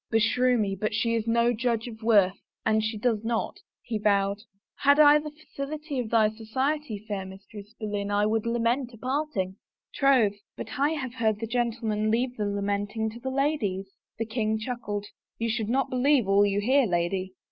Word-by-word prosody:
" - - -67
Beshrew 245 +3 +3
me, 200 -3 0
but 210 +2 -2
she 230 +1 +1
is 225 -1 -1
no 235 +1 +3
judge 235 0 -1
of 220 -1 -9
worth 200 -4 +3 0.2
an 220 0 +3
she 220 0 -2
does 225 -1 0
not," 225 0 -2 0.2
he 225 -3 -3
vowed. 200 -1 +2 0.2
" - - -66
Had 285 +1 +5
I 295 0 +8
the 300 0 -7 0.2
felicity 290 0 -4
of 235 -3 -3
thy 220 -2 +4
society, 260 +3 -2
fair 200 -3 -3
Mistress 200 +2 -11
Boleyn, 205 -2 -3
I 205 0 +2
would 220 +1 0
lament 235 +2 0
a - - -15
parting! 255 -7 -2 0.2
" - - -60
"Troth, 250 -8 +3 0.2
but - - -6
I 290 +3 +3
have 260 -6 -4
heard 220 -4 0
the 225 - -3
gentlemen 225 -2 -1
leave 245 +3 0
the 210 -3 -2
lamenting 205 +2 -2
to 235 - -10
the 265 - -4
ladies 260 -9 0
I 195 - -35
" - - -65
The 225 - -2
king 220 -1 -1
chuckled. 215 -3 -4 0.2
" - - -66
You 230 0 -1
should 220 -2 -2
not 265 +3 +1
believe 255 -2 +3
all 200 +1 +5
you 200 0 0
hear, 260 +3 +3
lady." 185 +1 -1
225 Hz, 205 wpm, -27 LUFS, 205-250 Hz, 0.2 s, I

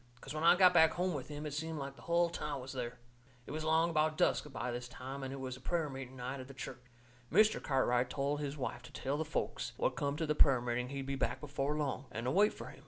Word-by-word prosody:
'Cause 135 - -7
when 155 +1 -3
I 170 - +8
got 180 -1 +7
back 160 -2 +6
home 180 +1 0
with 140 -4 -4
him 150 0 -6
it 150 - -4
seemed 160 +1 -3
like 140 -1 -5
the - - -15
hull 170 0 +2
town 150 -4 -3
was 130 +1 -7
there. 125 -2 -4 0.5
It - - -8
was 155 +2 -3
along 160 +2 +3
about 155 0 +2
dusk 150 - +2
by 125 - -3
this 120 +1 -4
time, 130 +3 -7
and 135 0 -4
it 135 - -5
was 130 -1 -4
a 130 - -13
prayer 160 0 -1
meeting 130 -1 -7
night 130 +2 -4
at 130 - -8
the 135 - -11
church. 125 0 -7 0.5
Mr. 215 +6 +5
Cartwright 125 -2 +2
told 140 +1 -1
his 145 0 -3
wife 125 -3 -3
to 120 - -12
tell 135 +2 -2
the 160 - 0
folks - - -2
what - - +1
come 140 0 -1
to 160 - 0
the 150 - +1
prayer 135 -4 +5
meeting 125 +1 -2
he'd 135 -1 -4
be 135 - -2
back 130 -1 -1
before 145 +1 -2
long, 140 -2 -2
and 115 +2 -4
to 125 - +1
wait 205 +6 +5
fur - - -8
him. - - -13
140 Hz, 275 wpm, -34 LUFS, 130-155 Hz, 0.5 s, I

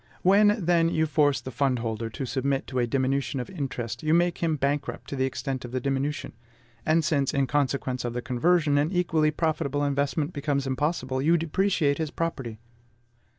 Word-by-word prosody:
When, 205 +1 +4
then, 170 -1 +3
you 160 -1 +1
force 145 -2 +2
the 130 - -7
fund 130 +1 +1
holder 115 -1 -3
to 130 +4 -5
submit 135 +2 -1
to 130 - -3
a 120 - +1
diminution 135 +2 0
of 125 - -5
interest, 130 -8 -4
you 155 +1 +2
make 175 0 +2
him 165 -2 +1
bankrupt 140 0 -2
to - - -2
the 130 -1 +1
extent 130 0 -3
of 120 - -7
the 130 - -1
diminution; 140 +3 -2 0.5
and 160 0 +3
since, 140 -2 +1
in 140 -1 +2
consequence 135 -2 -1
of 120 -1 -3
the 125 - -3
conversion, 145 +3 +2
an 150 +3 +1
equally 165 -4 +2
profitable 150 -2 -1
investment 145 +3 -1
becomes 140 -1 -1
impossible, 130 -1 -1
you 165 +4 +4
depreciate 165 -3 +1
his 160 -2 -1
property. 135 -9 -4
140 Hz, 185 wpm, -26 LUFS, 130-160 Hz, 0.5 s, When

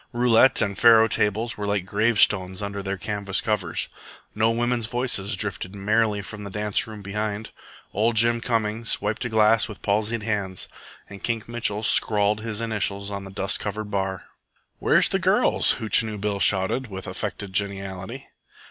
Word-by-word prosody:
Roulette 120 +1 +4
and 100 -2 -2
faro 115 -1 +7
tables 110 +2 0
were 105 - -3
like 100 -3 -1
gravestones 100 -2 +2
under 100 0 -4
their 100 0 -3
canvas 100 -1 -1
covers. 100 -6 -2 0.5
No 110 +1 +2
women's 120 0 0
voices 120 -4 -1
drifted 100 -1 -3
merrily 105 +1 +1
from 105 +1 -8
the 100 - -6
dance 105 +1 -1
room 105 -2 -9
behind. 105 +2 -4 0.4
Ol' 110 +3 +2
Jim 115 +1 +4
Cummings 115 -1 0
wiped 105 +1 -2
a - - -2
glass 110 0 +4
with 105 -3 -11
palsied 110 +2 0
hands, 100 -4 -2 0.4
and 100 -1 -12
Kink 115 -2 -2
Mitchell 115 -3 -2
scrawled 105 0 +3
his 110 -1 -4
initials 100 -3 -2
on 100 -1 -5
the - - -9
dust 95 0 -1
covered 105 0 -5
bar. 95 -2 -2 0.6
"Where's - - +4
the - - 0
girls?" - - +3
Hootchinoo 110 0 +1
Bill 100 0 -2
shouted, 100 +7 +2
with 95 -2 -8
affected 100 -2 -5
geniality. 100 +5 -4
105 Hz, 160 wpm, -24 LUFS, 100-115 Hz, 0.6 s, faro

